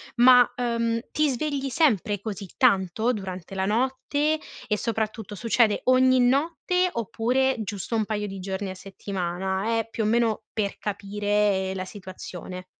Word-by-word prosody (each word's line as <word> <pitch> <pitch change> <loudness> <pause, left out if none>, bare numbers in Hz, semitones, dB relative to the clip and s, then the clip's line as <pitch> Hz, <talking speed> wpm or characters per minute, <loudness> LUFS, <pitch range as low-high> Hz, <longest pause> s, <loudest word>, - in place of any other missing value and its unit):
Ma, 250 0 +8
uhm, 230 -1 0
ti 300 -1 +2
svegli 275 +1 -2
sempre 220 - +2
così 200 -2 -6
tanto 220 0 +3
durante 190 -2 -6
la 190 0 0
notte, 265 +7 0 0.3
e 210 -1 +1
soprattutto 220 -1 -3
succede 225 0 +2
ogni 255 0 +5
notte 325 +8 +2
oppure 250 +4 0
giusto 205 +2 -4
un 215 -1 +1
paio 210 -1 -2
di 195 -1 -7
giorni 190 +1 -4
a 185 - -6
settimana? 190 +3 -2
È 225 - -3
più 225 -1 -2
o - - 0
meno 225 -1 +1
per 205 -2 -2
capire 205 -1 0
la 185 0 -3
situazione. 185 -2 -8
220 Hz, 145 wpm, -25 LUFS, 195-250 Hz, 0.3 s, Ma